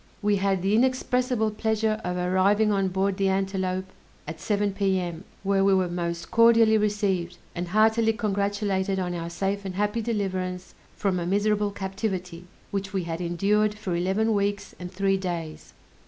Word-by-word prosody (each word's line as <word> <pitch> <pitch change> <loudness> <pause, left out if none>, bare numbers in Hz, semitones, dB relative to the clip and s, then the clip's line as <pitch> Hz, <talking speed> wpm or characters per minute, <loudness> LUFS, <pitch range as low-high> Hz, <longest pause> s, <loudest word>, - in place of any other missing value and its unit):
We 205 0 +3
had 195 -1 0
the 195 +2 +1
inexpressible 250 -1 +1
pleasure 220 0 0
of 180 0 -2
arriving 190 +4 +2
on 195 -1 +1
board 190 +1 0
the 195 -1 +2
Antelope 190 -1 -1 0.4
at 155 +1 -7
7 205 -1 0
P.M., 190 -3 -1 0.2
where 195 0 +2
we 195 0 +4
were 185 -2 +1
most 170 -1 -4
cordially 230 -1 +6
received, 200 -5 0 0.2
and 175 0 -4
heartily 220 +3 +3
congratulated 200 -2 -1
on 180 -1 -2
our 170 -1 -4
safe 195 +3 -2
and 190 -2 -5
happy 210 +3 0
deliverance 185 -5 -3 0.2
from 190 -3 0
a 170 - -3
miserable 205 +2 +1
captivity, 190 -3 -4 0.3
which 195 0 -3
we 190 -2 0
had 165 +1 -4
endured 205 +5 +1
for 200 -5 -3
eleven 195 +6 +1
weeks 200 0 -1
and 180 0 -7
three 195 0 +1
days. 170 -4 -5
195 Hz, 160 wpm, -26 LUFS, 185-210 Hz, 0.4 s, cordially